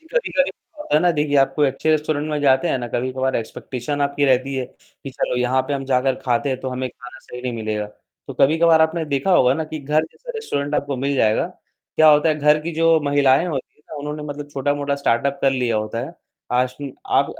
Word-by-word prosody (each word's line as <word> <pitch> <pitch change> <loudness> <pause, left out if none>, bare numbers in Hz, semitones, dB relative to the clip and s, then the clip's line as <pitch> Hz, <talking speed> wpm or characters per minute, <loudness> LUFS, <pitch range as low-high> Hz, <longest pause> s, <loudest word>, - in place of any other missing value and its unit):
जी, 320 - -24
कभी-कभी - - +1 0.3
होता 300 - -3
है 150 - +5
ना 175 +1 +4
देखिए 150 -2 0
आप 135 - +3
कोई 150 -1 +4
अच्छे 135 +4 -1
रेस्टोरेंट 155 -1 0
में 150 -1 -1
जाते 135 -2 +3
हैं - - 0
ना 120 - -4
कभी-कभार 130 +2 -1
एक्सपेक्टेशन 125 +4 -5
आपकी 140 0 0
रहती 130 +1 +2
है 130 -1 -2 0.2
कि 135 - -12
चलो 125 - -2
यहाँ 125 +1 +2
पे - - -1
हम 135 - -3
जाकर 130 0 +1
खाते 125 +2 +1
हैं, 130 -1 -2
तो 130 - -4
हमें 130 0 -3
खाना 125 +1 -13
सही 125 - -10
नहीं 125 -1 -2
मिलेगा, 110 -2 -3 0.4
तो - - -7
कभी-कभार 160 +3 +5
आपने 160 +1 0
देखा 140 +3 -1
होगा 130 -7 +5
ना 160 - -2
कि 155 0 -6
घर 150 +3 +1
जैसा - - -11
रेस्टोरेंट 145 - -3
आपको 140 -2 -1
मिल 140 +2 -1
जाएगा। 110 -3 +2 0.5
क्या 155 - +7
होता 150 +1 +5
है 155 - +3
घर 150 +1 +4
की 170 +2 -5
जो 165 0 +4
महिलाएँ 145 +2 +3
होती 145 -7 -5
हैं - - -31
ना 155 - -7
उन्होंने 150 +1 -5
मतलब 145 0 -6
छोटा-मोटा 145 +1 -1
स्टार्टअप 140 0 0
कर 135 - +4
लिया 125 -4 0
होता 110 +2 -3
है, 135 +7 -6 0.4
आज 125 +1 +1 0.3
आप - - +3
140 Hz, 230 wpm, -21 LUFS, 130-150 Hz, 0.5 s, क्या